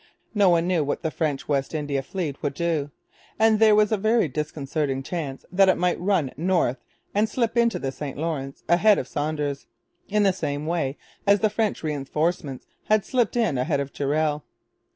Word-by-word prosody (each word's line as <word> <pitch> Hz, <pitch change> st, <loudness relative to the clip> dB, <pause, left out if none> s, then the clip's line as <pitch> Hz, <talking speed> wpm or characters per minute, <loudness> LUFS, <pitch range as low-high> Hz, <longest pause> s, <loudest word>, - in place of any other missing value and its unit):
No 205 Hz, -3 st, +4 dB
one 170 Hz, -1 st, +3 dB
knew 175 Hz, -4 st, +2 dB
what 145 Hz, -, -3 dB
the 160 Hz, -, -1 dB
French 150 Hz, -4 st, -2 dB
West 140 Hz, +1 st, -1 dB
India 145 Hz, -2 st, -1 dB
fleet 150 Hz, -1 st, -4 dB
would 145 Hz, -2 st, -2 dB
do; 160 Hz, -4 st, -1 dB, 0.5 s
and 220 Hz, -1 st, +4 dB
there 220 Hz, -1 st, +6 dB
was 210 Hz, 0 st, +3 dB
a 215 Hz, -, +2 dB
very 220 Hz, -1 st, +2 dB
disconcerting 145 Hz, -1 st, -2 dB
chance 145 Hz, -4 st, -5 dB
that 190 Hz, +1 st, +5 dB
it 185 Hz, -, +3 dB
might 180 Hz, 0 st, +1 dB
run 175 Hz, -7 st, +1 dB
north 165 Hz, -5 st, +1 dB, 0.4 s
and 210 Hz, +2 st, +2 dB
slip 230 Hz, 0 st, -1 dB
into 235 Hz, -1 st, +3 dB
the 135 Hz, -, -3 dB
St 135 Hz, 0 st, -6 dB
Lawrence, 145 Hz, -4 st, -4 dB
ahead 195 Hz, +5 st, +5 dB
of -, -, -3 dB
Saunders, 145 Hz, -2 st, -3 dB, 0.4 s
in 210 Hz, +1 st, +2 dB
the 195 Hz, -2 st, +4 dB
same 150 Hz, -4 st, -3 dB
way 155 Hz, -4 st, -1 dB, 0.3 s
as 200 Hz, 0 st, +5 dB
the 215 Hz, -, +2 dB
French 215 Hz, -3 st, -1 dB
reinforcements 150 Hz, -1 st, -2 dB, 0.2 s
had 215 Hz, 0 st, +3 dB
just -, -, -18 dB
slipped 245 Hz, -3 st, +1 dB
in 215 Hz, -, +1 dB
ahead 140 Hz, +2 st, 0 dB
of 140 Hz, 0 st, -4 dB
Durell. 150 Hz, +1 st, 0 dB
160 Hz, 190 wpm, -24 LUFS, 145-200 Hz, 0.5 s, there